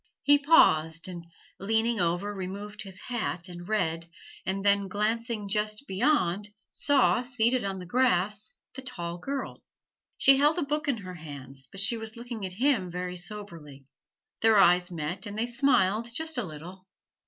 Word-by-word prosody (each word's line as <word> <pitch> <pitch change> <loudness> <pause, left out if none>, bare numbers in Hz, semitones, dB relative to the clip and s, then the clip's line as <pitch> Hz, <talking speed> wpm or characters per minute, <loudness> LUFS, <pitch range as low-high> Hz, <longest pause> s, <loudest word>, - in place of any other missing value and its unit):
He 290 0 +6
paused 165 - +4
and, 175 -2 -8 0.3
leaning 225 +3 +1
over 175 +4 0
removed 200 +2 -6
his 190 -2 -7
hat 220 -7 -3
and 175 -1 -9
read, 165 -6 0 0.4
and 195 +1 -2
then 200 -1 +3
glancing 215 +2 -1
just 210 +4 -1
beyond, 205 - +1 0.2
saw 275 -4 +3
seated 250 0 +1
on 195 -1 -2
the 180 - -7
grass 210 -2 +1 0.2
the 265 - -7
tall 175 -10 -5
girl. 275 +7 -5 0.6
She 270 0 +6
held 295 +4 +4
a 345 - +1
book 300 +2 -2
in 275 -4 +1
her 185 -3 -8
hands, 140 -5 -9
but 195 - -4
she 230 +4 +1
was 220 0 -7
looking 235 -4 -5
at 185 - -9
him 240 -4 +1
very 180 +1 -4
soberly. 170 -7 -6 0.6
Their 225 -1 +5
eyes 180 -1 +5
met, 170 +4 -4
and 205 +1 -6
they 225 - +1
smiled 235 -4 +2
just 320 +6 -3
a - - 0
little. 180 +3 -10
205 Hz, 165 wpm, -28 LUFS, 180-235 Hz, 0.6 s, He